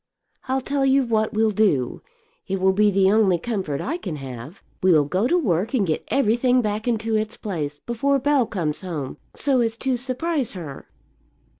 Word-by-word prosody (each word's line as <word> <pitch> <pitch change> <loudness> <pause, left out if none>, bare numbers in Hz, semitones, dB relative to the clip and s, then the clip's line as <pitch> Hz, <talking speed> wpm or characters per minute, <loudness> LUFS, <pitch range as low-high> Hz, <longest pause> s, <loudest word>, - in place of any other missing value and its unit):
I'll 265 +1 0
tell 275 +2 -1
you 270 0 +4
what 220 -3 0
we'll 220 0 +2
do; 190 - +1 0.5
it 195 0 -2
will 190 +1 +3
be 210 +2 +4
the 195 -1 +3
only 205 -4 +4
comfort 185 -8 -3
I 325 +5 -2
can 185 - -5
have; 135 +4 -9 0.2
we'll 165 -6 +4
go 185 - 0
to 350 - +3
work 215 - 0
and 215 -6 +2
get 160 -3 -1
everything 250 0 +2
back 215 0 -2
into 225 -1 0
its 215 +1 -2
place 155 -9 -4
before 240 - 0
Bell 275 -3 +2
comes 160 -7 -2
home, 155 -8 -5 0.2
so 265 -3 +2
as 225 -1 -1
to 260 +1 0
surprise 265 +2 -1
her." 160 -8 -8
215 Hz, 180 wpm, -23 LUFS, 180-250 Hz, 0.5 s, you